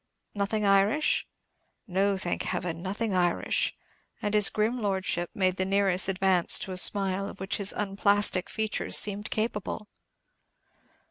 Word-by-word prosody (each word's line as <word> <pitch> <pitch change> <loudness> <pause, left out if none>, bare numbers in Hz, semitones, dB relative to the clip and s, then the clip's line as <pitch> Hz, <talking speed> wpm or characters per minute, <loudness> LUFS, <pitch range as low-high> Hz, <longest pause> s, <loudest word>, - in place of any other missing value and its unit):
"Nothing 205 +1 -2
Irish?" 200 +10 +2 0.6
"No, 195 0 0
thank 180 -2 -3
Heaven, 175 -2 -4
nothing 200 +3 -3
Irish;" 175 -2 0 0.4
and 205 - -3
his 210 -1 +6
grim 225 +3 -2
Lordship 190 -4 -2
made 185 -1 0
the 185 - 0
nearest 195 -1 +1
advance 190 -2 +3
to 190 - -3
a 185 - -5
smile 195 +1 +3
of - - -12
which 190 +2 -3
his 200 -1 -1
unplastic 200 -2 +1
features 220 -1 +1
seemed 205 0 +1
capable. 215 -1 -4
195 Hz, 135 wpm, -27 LUFS, 185-210 Hz, 0.6 s, his